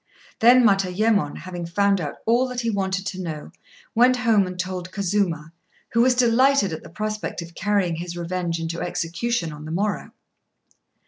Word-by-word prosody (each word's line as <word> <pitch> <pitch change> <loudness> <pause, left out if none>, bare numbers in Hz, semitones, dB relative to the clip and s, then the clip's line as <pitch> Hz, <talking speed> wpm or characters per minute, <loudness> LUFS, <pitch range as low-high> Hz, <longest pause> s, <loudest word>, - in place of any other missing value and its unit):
Then 245 +2 +7
Matayémon, 195 -3 +2
having 175 -2 -6
found 200 +2 +2
out 145 -3 -4
all 240 +3 +3
that 250 -1 -3
he 230 -1 0
wanted 190 -1 -1
to 185 0 -4
know, 155 -4 -6 0.4
went 250 +2 +5
home 225 -6 +3
and 180 0 -7
told 180 0 -4
Kazuma, 185 -5 -1 0.4
who 230 - +3
was 250 +1 +4
delighted 245 -4 +3
at 160 - -5
the - - -12
prospect 215 +4 -4
of 170 0 -12
carrying 195 -4 0
his 175 +1 -6
revenge 170 -1 -2
into 165 +1 -4
execution 170 +1 -2
on 150 +1 -9
the 155 - -6
morrow. 200 +5 -1
190 Hz, 170 wpm, -23 LUFS, 170-225 Hz, 0.4 s, Then